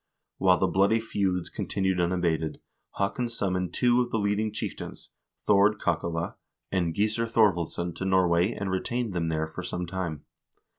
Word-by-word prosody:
While 90 Hz, -1 st, +5 dB
the -, -, +2 dB
bloody 100 Hz, +4 st, +3 dB
feuds 95 Hz, -5 st, -1 dB
continued 95 Hz, -2 st, -1 dB
unabated, 85 Hz, -3 st, 0 dB, 0.4 s
Haakon 100 Hz, +5 st, 0 dB
summoned 90 Hz, -6 st, -2 dB
two 125 Hz, 0 st, +4 dB
of 120 Hz, -, -1 dB
the 115 Hz, -, 0 dB
leading 105 Hz, +1 st, 0 dB
chieftains, 110 Hz, -, -6 dB, 0.3 s
Thord 100 Hz, +1 st, +4 dB
Kakale 85 Hz, 0 st, -1 dB, 0.3 s
and 85 Hz, -4 st, 0 dB
Gissur 110 Hz, +3 st, +1 dB
Thorvaldsson, 85 Hz, -6 st, +1 dB
to 95 Hz, -, -3 dB
Norway 90 Hz, 0 st, +3 dB
and 100 Hz, -4 st, -3 dB
retained 115 Hz, +3 st, -1 dB
them 85 Hz, -2 st, -1 dB
there 80 Hz, 0 st, 0 dB
for 80 Hz, -, -7 dB
some 90 Hz, 0 st, -3 dB
time. 85 Hz, -4 st, -4 dB
95 Hz, 150 wpm, -27 LUFS, 85-105 Hz, 0.4 s, While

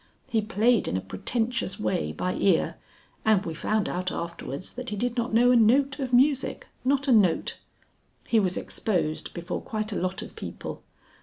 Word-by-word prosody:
He 225 Hz, -, +3 dB
played 225 Hz, +2 st, +2 dB
in 90 Hz, -, 0 dB
a -, -, 0 dB
pretentious 225 Hz, -, -2 dB
way 80 Hz, -8 st, -1 dB
by 180 Hz, -, -2 dB
ear, 185 Hz, -5 st, +2 dB, 0.5 s
and 215 Hz, -3 st, +3 dB
we 165 Hz, -, -3 dB
found 215 Hz, +6 st, 0 dB
out 185 Hz, +1 st, -2 dB
afterwards 170 Hz, -1 st, -5 dB
that 250 Hz, 0 st, -6 dB
he 210 Hz, -, -3 dB
did 240 Hz, +3 st, -1 dB
not 240 Hz, 0 st, -1 dB
know 240 Hz, +2 st, +5 dB
a -, -, +5 dB
note 265 Hz, +5 st, +4 dB
of 260 Hz, -2 st, -2 dB
music 265 Hz, +2 st, +3 dB, 0.2 s
not 275 Hz, +2 st, +1 dB
a -, -, +4 dB
note. 200 Hz, -8 st, +3 dB, 0.7 s
He 230 Hz, -, +3 dB
was 185 Hz, -3 st, 0 dB
exposed 160 Hz, -7 st, -1 dB
before 175 Hz, +1 st, -4 dB
quite 215 Hz, -1 st, -3 dB
a -, -, -2 dB
lot 185 Hz, +1 st, -2 dB
of -, -, -11 dB
people. -, -, -7 dB
215 Hz, 180 wpm, -27 LUFS, 180-245 Hz, 0.7 s, know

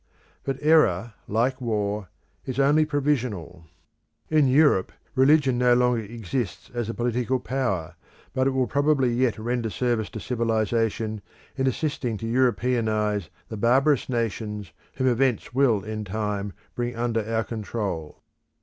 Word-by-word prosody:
But 135 Hz, -1 st, -2 dB
error, 120 Hz, -, +3 dB
like 125 Hz, +5 st, 0 dB
war, 105 Hz, -4 st, -2 dB, 0.3 s
is 130 Hz, 0 st, -4 dB
only 145 Hz, +3 st, +4 dB
provisional. 125 Hz, -, -1 dB, 0.7 s
In 155 Hz, -3 st, +5 dB
Europe, 135 Hz, -8 st, +4 dB, 0.2 s
religion 135 Hz, -2 st, +4 dB
no 125 Hz, -1 st, +5 dB
longer 125 Hz, -1 st, +2 dB
exists 110 Hz, 0 st, -4 dB
as 120 Hz, -2 st, -2 dB
a -, -, -2 dB
political 125 Hz, +2 st, 0 dB
power, 120 Hz, -11 st, -2 dB, 0.4 s
but 130 Hz, +1 st, +2 dB
it -, -, +4 dB
will 130 Hz, -1 st, +1 dB
probably 140 Hz, -2 st, +2 dB
yet 125 Hz, -1 st, +1 dB
render 115 Hz, +1 st, -2 dB
service 120 Hz, -2 st, -1 dB
to 110 Hz, -, -7 dB
civilisation 115 Hz, -2 st, -1 dB, 0.3 s
in 135 Hz, -1 st, 0 dB
assisting 130 Hz, -4 st, -1 dB
to 115 Hz, -, -6 dB
Europeanise 115 Hz, -5 st, +1 dB, 0.2 s
the 110 Hz, -, -5 dB
barbarous 135 Hz, +6 st, +3 dB
nations 105 Hz, -5 st, -3 dB, 0.2 s
whom 130 Hz, -, -1 dB
events 125 Hz, -1 st, +1 dB
will 120 Hz, -7 st, +3 dB
in 110 Hz, 0 st, -4 dB
time 105 Hz, -1 st, -3 dB, 0.2 s
bring 120 Hz, 0 st, -3 dB
under 115 Hz, -1 st, 0 dB
our 115 Hz, +1 st, -1 dB
control. 105 Hz, -8 st, -4 dB
120 Hz, 135 wpm, -25 LUFS, 110-130 Hz, 0.7 s, In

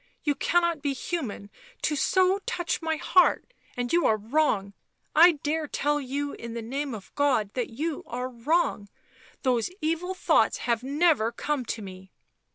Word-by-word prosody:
" -, -, -46 dB
You 295 Hz, -, +2 dB
cannot 340 Hz, +2 st, +1 dB
be 280 Hz, -1 st, 0 dB
human 255 Hz, -9 st, -4 dB, 0.3 s
to 300 Hz, -, +1 dB
so 375 Hz, +6 st, +3 dB
touch 350 Hz, -2 st, -1 dB
my 320 Hz, -1 st, 0 dB
heart, 365 Hz, +9 st, +3 dB, 0.2 s
and 245 Hz, +2 st, -2 dB
you 345 Hz, 0 st, +4 dB
are 215 Hz, -, +3 dB
wrong, 215 Hz, -4 st, 0 dB, 0.4 s
I 340 Hz, +3 st, +8 dB
dare 305 Hz, +1 st, -2 dB
tell 295 Hz, +1 st, 0 dB
you 280 Hz, +2 st, -3 dB
in 235 Hz, 0 st, -7 dB
the 235 Hz, -, -3 dB
name 270 Hz, +2 st, -3 dB
of 200 Hz, -, -12 dB
God 260 Hz, -8 st, +1 dB
that 250 Hz, -2 st, -2 dB
you 300 Hz, +6 st, -3 dB
are 250 Hz, +1 st, -3 dB
wrong 250 Hz, -4 st, 0 dB, 0.3 s
— 260 Hz, 0 st, -26 dB
those 245 Hz, -1 st, +1 dB
evil 330 Hz, +4 st, -1 dB
thoughts -, -, +3 dB
have 235 Hz, -2 st, +1 dB
never 280 Hz, -4 st, +2 dB
come 270 Hz, +2 st, -2 dB
to 220 Hz, -1 st, -4 dB
me." 190 Hz, 0 st, -11 dB
285 Hz, 170 wpm, -27 LUFS, 235-320 Hz, 0.4 s, I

